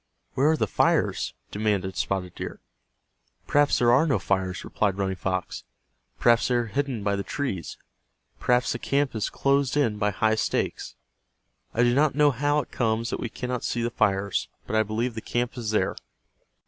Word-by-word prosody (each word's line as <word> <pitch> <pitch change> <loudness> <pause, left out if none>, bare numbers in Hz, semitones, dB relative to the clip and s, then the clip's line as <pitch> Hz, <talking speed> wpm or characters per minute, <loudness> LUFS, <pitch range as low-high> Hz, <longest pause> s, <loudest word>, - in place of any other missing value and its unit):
"Where 140 +4 +3
are 160 - +3
the - - +1
fires?" - - +1 0.2
demanded 100 -3 -1
Spotted 90 -2 -2
Deer. - - -6 0.9
"Perhaps 145 0 +3
there 120 -1 +4
are 140 +7 +4
no 135 -7 +2
fires," 95 -1 -1
replied 100 -3 -1
Running 95 -1 -1
Fox. 95 0 -3 0.6
"Perhaps 120 -1 +4
they 125 - +1
are 120 -1 +1
hidden 125 0 -2
by 100 0 +1
the 100 - -2
trees. 100 - -4 0.6
Perhaps 125 0 +2
the 120 - -3
camp 140 +1 0
is 110 -2 -1
closed 140 0 +1
in 115 -8 +1
by 105 0 +2
high 110 +2 +1
stakes. 110 - -2 0.8
I 120 - +2
do 120 0 +4
not 145 +1 +3
know 145 -1 +5
how 145 +3 +1
it - - -13
comes 115 -1 0
that - - -2
we 120 - -3
cannot 125 +1 -4
see 120 - -1
the 120 - -1
fires, 100 -2 +1 0.2
but - - -3
I 110 - +5
believe 110 +3 -1
the 110 - -5
camp 120 +2 -2
is 120 -4 -4
there." 110 - +1
115 Hz, 185 wpm, -26 LUFS, 100-130 Hz, 0.9 s, know